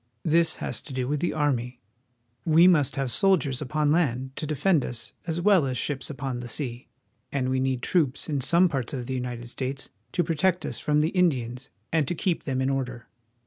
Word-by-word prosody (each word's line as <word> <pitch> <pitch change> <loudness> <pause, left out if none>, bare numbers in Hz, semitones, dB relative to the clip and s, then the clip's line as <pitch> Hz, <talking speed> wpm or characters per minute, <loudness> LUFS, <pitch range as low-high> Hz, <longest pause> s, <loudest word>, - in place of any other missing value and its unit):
This 165 0 +3
has - - -3
to 140 - -10
do 130 -1 -2
with 145 +2 0
the 175 - 0
army. 125 -5 -1 0.6
We 165 +2 +6
must 155 -7 +3
have 135 -3 -1
soldiers 155 - +2
upon 150 +2 0
land 135 -5 0
to 155 - -3
defend 155 +1 +2
us 120 -2 -6
as 165 0 -1
well 180 -5 +4
as 130 -1 -2
ships 140 0 -2
upon 135 -4 -4
the 120 - -6
sea, 120 0 -4 0.4
and 130 -2 -1
we 130 0 +1
need 130 -1 -1
troops 150 -7 +1
in 145 -4 -1
some 170 +7 +4
parts 135 -7 -3
of 125 -3 -3
the 130 - -4
United 125 -2 -4
States 130 +2 -4 0.2
to 175 - +2
protect 175 +3 +1
us - - -4
from 150 0 +2
the 155 - +2
Indians 135 -8 0 0.2
and 155 -4 +2
to 175 - -1
keep 175 +1 -1
them 130 -2 -1
in 130 - +1
order. 125 -3 -4
140 Hz, 205 wpm, -26 LUFS, 130-160 Hz, 0.6 s, We